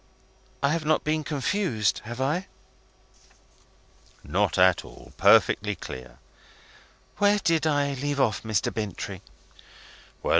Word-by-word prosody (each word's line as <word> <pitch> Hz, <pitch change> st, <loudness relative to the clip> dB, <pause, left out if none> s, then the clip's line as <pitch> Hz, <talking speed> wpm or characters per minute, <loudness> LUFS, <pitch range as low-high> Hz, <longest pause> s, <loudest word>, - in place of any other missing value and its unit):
I 140 Hz, -, +4 dB
have 165 Hz, -1 st, -1 dB
not 155 Hz, +1 st, +1 dB
been 155 Hz, 0 st, 0 dB
confused, 145 Hz, -, 0 dB
have 120 Hz, +2 st, -7 dB
I?" 150 Hz, +8 st, -1 dB, 1.8 s
"Not -, -, 0 dB
at 90 Hz, -1 st, +4 dB
all. -, -, -14 dB
Perfectly 105 Hz, 0 st, +4 dB
clear." 65 Hz, -6 st, -9 dB, 1.0 s
"Where 205 Hz, 0 st, +4 dB
did 165 Hz, -5 st, +1 dB
I 145 Hz, -2 st, +1 dB
leave 140 Hz, +1 st, -3 dB
off, 120 Hz, -6 st, +1 dB
Mr. 110 Hz, -3 st, -1 dB
Bintrey?" 105 Hz, -5 st, -5 dB
140 Hz, 110 wpm, -26 LUFS, 110-155 Hz, 1.8 s, I